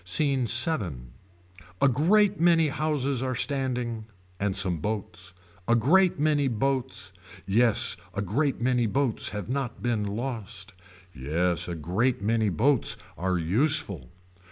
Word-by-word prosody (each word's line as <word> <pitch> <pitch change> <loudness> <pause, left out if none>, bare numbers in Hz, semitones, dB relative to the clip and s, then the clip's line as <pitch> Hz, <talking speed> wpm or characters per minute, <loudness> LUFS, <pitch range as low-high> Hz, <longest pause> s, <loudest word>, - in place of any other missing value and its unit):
SCENE 130 - +1
VII. 100 - +1 0.7
A 140 - +4
great 195 - +3
many 165 -2 +4
houses 140 -3 -1
are 130 -1 -2
standing. 125 -4 -2 0.3
And 100 -1 -1
some 95 -3 +2
boats. 95 -1 -5 0.3
A 115 - +4
great 175 - +3
many 150 -2 +2
boats. 130 -4 -2 0.3
Yes 110 +3 +2 0.2
a 100 - -1
great 135 - -1
many 125 -1 +1
boats 135 0 -1
have 105 -3 -6
not 130 -1 -4
been 120 -4 0
lost. 110 -2 -5 0.4
Yes 85 +6 -1
a 85 - -4
great 95 - 0
many 110 +1 +1
boats 130 +7 +1 0.2
are 90 +1 -1
useful. 95 - +1
120 Hz, 130 wpm, -26 LUFS, 100-140 Hz, 0.7 s, A